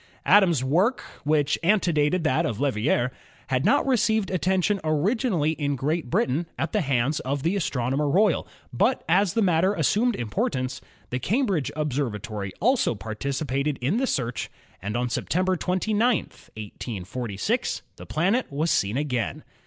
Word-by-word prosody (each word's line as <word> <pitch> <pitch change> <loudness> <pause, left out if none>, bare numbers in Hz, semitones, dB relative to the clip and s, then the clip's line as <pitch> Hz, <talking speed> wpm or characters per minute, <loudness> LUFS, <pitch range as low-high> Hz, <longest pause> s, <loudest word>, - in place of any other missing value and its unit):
Adams' 175 -10 +5
work, 180 - +2 0.2
which 145 -1 +1
antedated 170 -3 +2
that 155 -5 +2
of 115 - -2
Leverrier, 130 -1 +1 0.4
had 130 0 +1
not - - +3
received 220 -6 +1
attention 190 +3 +1
originally 165 - +1
in 145 -3 -1
Great 150 +2 -2
Britain 145 +8 0
at 160 - -2
the 210 - +1
hands 135 0 +1
of 135 +1 -3
the 170 +5 +1
Astronomer 140 -4 0
Royal, 190 +1 +2 0.3
but - - +1
as 180 +2 +3
the 225 - +3
matter 185 +2 +2
as - - 0
sumed 235 +2 +2
importance 125 - -2 0.3
the 125 - -1
Cambridge 200 - 0
Observatory 110 -9 -3
also 245 - +2
par 110 +2 -6
ticipated 140 +3 -2
in 140 - 0
the 265 +2 +1
search 120 - -2 0.3
and 105 +4 -3
on 125 +1 0
September 185 +9 0
29, 185 +5 -1 0.2
1846, 105 0 -4
the - - -11
planet 195 - 0
was 155 +4 0
seen 100 +5 +1
again. 125 - -2
150 Hz, 145 wpm, -25 LUFS, 125-185 Hz, 0.4 s, Adams